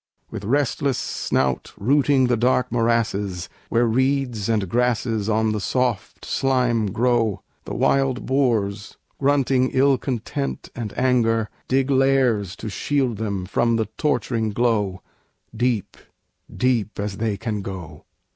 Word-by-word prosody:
With 105 Hz, -3 st, -6 dB
restless 140 Hz, +1 st, +1 dB
snout 65 Hz, -2 st, -1 dB
rooting 135 Hz, +3 st, +3 dB
the 125 Hz, -1 st, +2 dB
dark 125 Hz, +1 st, +1 dB
morasses, 110 Hz, -6 st, 0 dB, 0.2 s
Where 120 Hz, +1 st, +3 dB
reeds 125 Hz, -2 st, 0 dB
and 105 Hz, -4 st, +1 dB
grasses 115 Hz, -1 st, 0 dB
on 110 Hz, 0 st, +2 dB
the 105 Hz, -, -1 dB
soft 120 Hz, -1 st, -2 dB
slime 125 Hz, -5 st, +1 dB
grow, 115 Hz, -2 st, +1 dB, 0.2 s
The -, -, -5 dB
wild 135 Hz, -2 st, +1 dB
boars, 110 Hz, -7 st, 0 dB, 0.2 s
grunting 135 Hz, -2 st, +2 dB
ill 135 Hz, 0 st, +4 dB
content 135 Hz, +2 st, -4 dB
and 115 Hz, -4 st, -4 dB
anger, 115 Hz, -4 st, +2 dB, 0.2 s
Dig 135 Hz, +1 st, +1 dB
lairs 130 Hz, -8 st, +2 dB
to 110 Hz, -, -7 dB
shield 125 Hz, +2 st, -1 dB
them 100 Hz, -4 st, -3 dB
from 115 Hz, +5 st, +1 dB
the 110 Hz, -1 st, +1 dB
torturing 120 Hz, -7 st, 0 dB
glow, 105 Hz, -4 st, 0 dB, 0.5 s
Deep, 120 Hz, -3 st, -1 dB, 0.6 s
deep 120 Hz, -6 st, 0 dB
as 100 Hz, -1 st, -3 dB
they 110 Hz, -2 st, -1 dB
can 105 Hz, +1 st, -3 dB
go. 90 Hz, -6 st, -8 dB
115 Hz, 125 wpm, -22 LUFS, 105-130 Hz, 0.6 s, ill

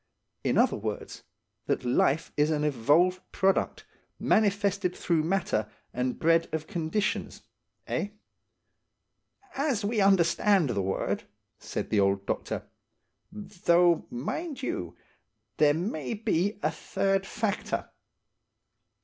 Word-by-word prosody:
In -, -, +1 dB
other -, -, +4 dB
words, -, -, -5 dB, 0.5 s
that -, -, 0 dB
life 135 Hz, +5 st, +2 dB
is 150 Hz, +1 st, +3 dB
an 150 Hz, -1 st, 0 dB
evolved 150 Hz, +7 st, +3 dB
product, 195 Hz, -1 st, +1 dB, 0.3 s
manifested 200 Hz, -3 st, +1 dB
through 170 Hz, -3 st, +1 dB
matter 160 Hz, -, 0 dB, 0.2 s
and 125 Hz, 0 st, -1 dB
bred 165 Hz, +1 st, +3 dB
of 155 Hz, 0 st, -2 dB
conditions–eh?" 175 Hz, +4 st, -3 dB, 1.5 s
"As 270 Hz, -7 st, 0 dB
we 215 Hz, 0 st, +1 dB
understand 190 Hz, -3 st, +4 dB
the 100 Hz, -4 st, 0 dB
word," 95 Hz, 0 st, -2 dB, 0.3 s
said -, -, -5 dB
the 105 Hz, -, +3 dB
old 100 Hz, 0 st, +2 dB
doctor. -, -, -3 dB, 0.6 s
"Though, 175 Hz, -4 st, +2 dB
mind 275 Hz, -, -4 dB
you, 90 Hz, -, -3 dB, 0.6 s
there 150 Hz, -1 st, +5 dB
may 160 Hz, -, -3 dB
be 205 Hz, -2 st, 0 dB
a 155 Hz, -, +2 dB
third 195 Hz, +4 st, -1 dB
factor. 215 Hz, -2 st, -2 dB
175 Hz, 105 wpm, -28 LUFS, 150-200 Hz, 1.5 s, there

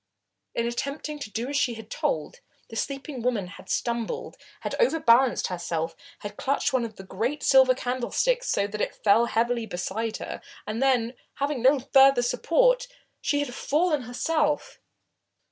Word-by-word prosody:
In 235 Hz, -, 0 dB
attempting 280 Hz, +5 st, -3 dB
to 255 Hz, -, -6 dB
do 230 Hz, +3 st, -3 dB
as 285 Hz, -, -3 dB
she 280 Hz, -4 st, +2 dB
was 225 Hz, -1 st, -9 dB
told, 155 Hz, -1 st, -2 dB, 0.3 s
the -, -, -7 dB
sleeping 275 Hz, +3 st, -4 dB
woman 230 Hz, -5 st, 0 dB
had 180 Hz, -, -12 dB
stumbled, 235 Hz, -2 st, -2 dB, 0.3 s
had -, -, -4 dB
overbalanced 265 Hz, -, +4 dB
herself, 165 Hz, -2 st, -3 dB, 0.3 s
had 205 Hz, -, -7 dB
clutched 275 Hz, 0 st, 0 dB
one 255 Hz, -2 st, +2 dB
of 225 Hz, -2 st, -6 dB
the 195 Hz, -, -10 dB
great 230 Hz, +10 st, -3 dB
silver 265 Hz, -1 st, +6 dB
candlesticks 260 Hz, -, 0 dB
so 200 Hz, -, +2 dB
that 210 Hz, +1 st, -4 dB
it -, -, -3 dB
fell 220 Hz, +3 st, +5 dB
heavily 235 Hz, 0 st, 0 dB
beside 215 Hz, +4 st, -3 dB
her, -, -, -6 dB, 0.2 s
and 215 Hz, +3 st, -3 dB
then, 250 Hz, -3 st, +2 dB, 0.2 s
having 280 Hz, -2 st, -1 dB
no 265 Hz, +3 st, +5 dB
further 270 Hz, -1 st, +5 dB
support, -, -, +2 dB, 0.3 s
she 290 Hz, 0 st, +1 dB
had 285 Hz, -4 st, -4 dB
fallen 300 Hz, +3 st, +1 dB
herself. 295 Hz, +5 st, -1 dB
245 Hz, 160 wpm, -26 LUFS, 225-285 Hz, 0.3 s, silver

